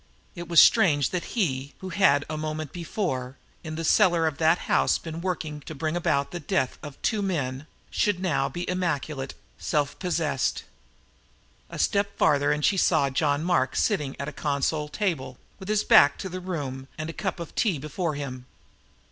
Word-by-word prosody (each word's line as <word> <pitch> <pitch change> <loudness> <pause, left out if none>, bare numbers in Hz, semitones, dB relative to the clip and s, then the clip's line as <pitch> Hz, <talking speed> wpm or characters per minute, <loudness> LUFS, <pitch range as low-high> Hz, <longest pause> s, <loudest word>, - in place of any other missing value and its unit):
It 175 -2 -7
was 170 -1 +6
strange 145 -6 +5
that 180 -2 -2
he, 140 - -1
who 190 - -7
had, 165 -8 +3
a 155 - -4
moment 155 -1 -4
before, 155 -7 -3 0.3
in 155 -1 -5
the 165 - -4
very - - +4
cellar 175 -6 +4
of 155 -2 -2
that 160 +1 +4
house, - - +3
been 165 0 -7
working 160 -5 -3
to 160 - -6
bring 155 +3 -2
about 140 -5 0
the 175 - -4
death 130 -4 -1
of 145 -2 -9
two 220 -3 +1
men, 145 -7 -2 0.2
should 205 -4 +1
now 140 -7 0
be 175 +6 -5
immaculate, 155 -6 -2 0.2
self 145 -2 -1
possessed. 160 -7 -1 1.1
A - - -8
step 200 0 0
farther 145 0 +3
and 150 0 +1
she 195 - +3
saw 155 -6 +3
John 145 +2 +1
Mark 170 -7 +1
sitting 150 -11 0
at 140 - -3
a - - -3
console 150 +1 -1
table, 150 - -2 0.2
with 190 - -9
his 215 0 +2
back 145 - +6
to 190 - -5
the 185 +1 -5
room 140 -8 -5
and 155 0 -4
a 165 - -5
cup 190 -1 -3
of 170 - -7
tea 200 -9 +1
before 155 +3 -3
him. 130 -3 -6
155 Hz, 185 wpm, -26 LUFS, 140-180 Hz, 1.1 s, was